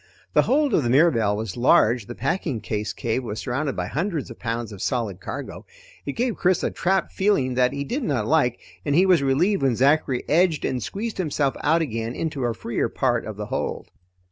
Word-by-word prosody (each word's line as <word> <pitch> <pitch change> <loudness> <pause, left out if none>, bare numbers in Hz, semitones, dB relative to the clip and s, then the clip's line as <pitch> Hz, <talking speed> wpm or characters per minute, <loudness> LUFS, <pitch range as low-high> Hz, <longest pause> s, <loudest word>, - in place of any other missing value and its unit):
The - - +6
hold 285 -2 +2
of - - +4
the 120 - -1
Mirabelle 120 -7 +3
was 110 -4 -4
large, 120 -2 +3
the 120 - -7
packing 140 -3 -1
case 105 0 -3
cave 120 +3 -2
was 110 -3 -5
surrounded 135 +3 -2
by 90 - -2
hundreds 150 - -3
of 115 - -11
pounds 115 -1 -3
of 100 -2 -9
solid 115 -9 -2
cargo. 90 - -7 0.4
It 140 - -2
gave 240 -1 -1
Chris 185 -1 +2
a - - 0
trapped 190 +2 0
feeling 190 -11 +1
that 125 0 +2
he 140 0 -3
did 250 - -3
not 135 - -1
like, 135 -4 +2 0.2
and 145 -1 0
he 180 +4 +5
was 180 -5 +4
relieved 160 +9 +2
when 135 -3 +2
Zachary 135 0 +2
edged 165 -1 +2
and 125 - -1
squeezed 210 - -4
himself 145 -5 0
out 165 +3 +3
again 115 -3 -4
into 150 -6 -2
a 115 -1 -1
freer 115 - -2
part 120 -3 0
of 110 -2 -7
the 105 - -4
hold. - - -4
135 Hz, 210 wpm, -24 LUFS, 115-165 Hz, 0.4 s, The